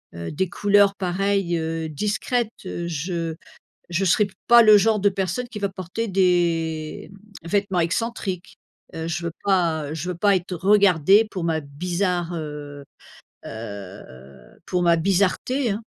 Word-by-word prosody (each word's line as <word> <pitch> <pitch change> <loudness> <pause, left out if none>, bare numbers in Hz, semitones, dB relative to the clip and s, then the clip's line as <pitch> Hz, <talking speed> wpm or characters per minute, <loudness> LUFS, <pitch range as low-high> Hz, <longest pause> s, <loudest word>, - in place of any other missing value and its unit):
heu, 85 0 -6
des 185 +4 -1
couleurs, 200 0 +3
pareil, 195 -1 0
heu, 160 0 -3
discrètes. 210 - -1 0.2
Heu, 175 -2 -4
je 165 +1 -3 0.5
je 175 +2 0
serais 200 +3 +3 0.2
pas 235 -1 +8
le 215 -1 +8
genre 215 +1 +2
de 200 - +2
personne 195 +5 -3
qui 225 -4 -7
va 200 -1 -1
porter 190 +4 -5
des 170 -5 0 0.3
vêtements 195 +1 0
excentriques. 190 +1 -3 0.4
Heu, 160 0 -4
je 170 +1 -3
veux 170 - -2
pas 165 -6 +1
je 165 +3 -4
veux 180 - -3
pas 200 +2 +3
être 180 0 -3
regardée 195 +1 +4
pour 180 -3 -4
ma 160 -1 0
bizarre, 175 +4 -2
heu 150 -2 -7 0.6
heu, 100 -3 -8 0.6
pour 180 -1 0
ma 170 -1 +4
bizarreté, 200 - +1
hein. 210 +3 -5
180 Hz, 145 wpm, -23 LUFS, 165-200 Hz, 0.6 s, pas